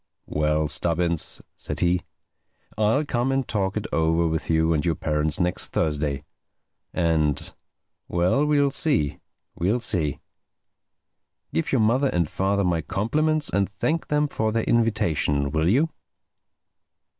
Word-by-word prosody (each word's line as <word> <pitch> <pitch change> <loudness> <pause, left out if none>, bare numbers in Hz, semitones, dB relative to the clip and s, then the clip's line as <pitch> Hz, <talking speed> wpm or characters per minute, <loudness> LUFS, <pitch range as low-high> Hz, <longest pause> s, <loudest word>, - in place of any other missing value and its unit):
"Well, 75 0 0
Stubbins," 85 0 0
said 75 - -4
he, 90 +1 +2 0.7
"I'll 110 +8 +2
come 125 -1 0
and 135 -1 0
talk 100 -1 -1
it 105 - -3
over 80 +1 +2
with 80 -1 -3
you 80 0 +3
and 75 - 0
your 85 -2 +1
parents 75 0 -1
next 90 -1 0
Thursday. 75 -2 -1 0.7
And—well, 85 - -1
we'll 145 -2 +3
see. 135 - +1 0.3
We'll 100 +8 0
see. 85 - 0 1.3
Give 80 - -1
your 130 - +3
mother 125 +6 +3
and 85 - 0
father 100 +4 0
my 85 -3 +1
compliments 155 - 0
and 100 -1 +1
thank 155 +11 -2
them 150 0 +1
for 110 -6 -1
their 115 0 0
invitation, 80 -11 +1
will 80 +3 +1
you?" 145 +10 +2
90 Hz, 130 wpm, -24 LUFS, 80-120 Hz, 1.3 s, you